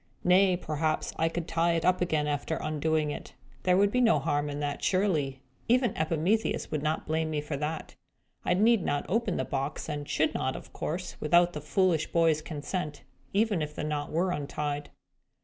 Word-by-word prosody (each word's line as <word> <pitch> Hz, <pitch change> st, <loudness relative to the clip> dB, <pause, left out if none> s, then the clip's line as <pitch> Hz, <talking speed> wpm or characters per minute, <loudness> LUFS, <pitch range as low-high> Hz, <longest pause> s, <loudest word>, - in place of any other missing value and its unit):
Nay, 185 Hz, 0 st, +5 dB
perhaps 155 Hz, -2 st, -1 dB
I 165 Hz, +1 st, +2 dB
could 165 Hz, 0 st, -4 dB
tie 170 Hz, +1 st, +2 dB
it 165 Hz, -1 st, 0 dB
up 185 Hz, 0 st, +3 dB
again, 155 Hz, -4 st, +1 dB
after 145 Hz, +2 st, -1 dB
undoing 155 Hz, 0 st, 0 dB
it. -, -, -8 dB, 0.3 s
There 180 Hz, +3 st, +3 dB
would 200 Hz, +1 st, +4 dB
be 250 Hz, -, +2 dB
no 225 Hz, -9 st, +5 dB
harm 145 Hz, +1 st, 0 dB
in 145 Hz, 0 st, -4 dB
that, 145 Hz, -1 st, -3 dB
surely. 155 Hz, -9 st, +1 dB, 0.2 s
Even 245 Hz, +1 st, +3 dB
Epimetheus 165 Hz, +8 st, 0 dB
would 155 Hz, -2 st, -1 dB
not 155 Hz, +1 st, -1 dB
blame 160 Hz, 0 st, 0 dB
me 155 Hz, -1 st, -1 dB
for 150 Hz, 0 st, -4 dB
that. 155 Hz, +2 st, -4 dB, 0.5 s
I 175 Hz, -, +2 dB
need 220 Hz, 0 st, +4 dB
not 145 Hz, -2 st, -1 dB
open 215 Hz, -1 st, 0 dB
the -, -, -1 dB
box, 140 Hz, +1 st, -3 dB
and 145 Hz, -1 st, -4 dB
should 155 Hz, -, +1 dB
not, 130 Hz, 0 st, -1 dB
of -, -, -10 dB
course, 175 Hz, +3 st, -4 dB
without 175 Hz, +3 st, +4 dB
the 150 Hz, -, -5 dB
foolish 165 Hz, +1 st, +2 dB
boy's 165 Hz, -2 st, +3 dB
consent, 150 Hz, +1 st, -4 dB, 0.3 s
even 205 Hz, -3 st, +2 dB
if 150 Hz, 0 st, -4 dB
the -, -, -3 dB
knot 150 Hz, -1 st, -2 dB
were 180 Hz, +3 st, +1 dB
untied." 145 Hz, -1 st, -3 dB
160 Hz, 190 wpm, -29 LUFS, 150-180 Hz, 0.5 s, Nay